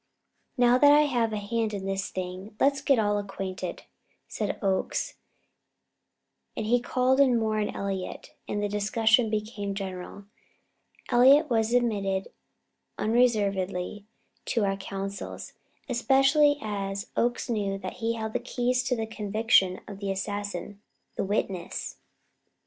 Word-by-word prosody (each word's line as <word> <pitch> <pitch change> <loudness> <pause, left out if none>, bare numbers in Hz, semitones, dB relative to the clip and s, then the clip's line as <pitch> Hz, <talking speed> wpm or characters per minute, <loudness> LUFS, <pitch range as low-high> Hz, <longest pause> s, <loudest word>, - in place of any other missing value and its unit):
"Now 245 0 +5
that 290 +1 +7
I 295 +1 +7
have 245 -6 +1
a 215 - -2
hand 215 +1 -2
in 195 -1 -5
this 195 0 -2
thing, 185 +3 -6
let's 275 0 +3
all - - -22
get 275 -3 +4 0.3
acquainted," 190 -2 -5 0.4
said - - -3
Oakes; 195 -2 -1 1.4
and - - -2
he 245 +3 +3
called 255 +2 +1
in 260 -4 +5
Moore 220 -1 0
and 210 - -2
Elliott, 195 -2 -4
and 205 0 -2
the - - +1
discussion 220 +3 +2
became 210 -2 -3
general. 190 0 -6 0.9
Elliott 270 +4 +6
was 225 -1 +2
admitted 200 -6 0 0.7
unreservedly 205 -4 0 0.4
to 225 -3 +1
our 195 0 0
councils, 195 0 -6 0.3
especially 270 +3 +4
as 200 0 -4
Oakes 240 +1 0
knew 205 -4 -1
that 185 -1 -7
he 230 0 -1
held 220 -1 -4
the - - 0
keys 250 +1 0
to 250 - +1
the 225 -1 -2
conviction 215 -3 +2
of 200 -1 -8
the 200 -1 -3
assassin 205 0 -4 0.3
the - - -1
witness. 195 -3 -3
215 Hz, 135 wpm, -27 LUFS, 195-240 Hz, 1.4 s, that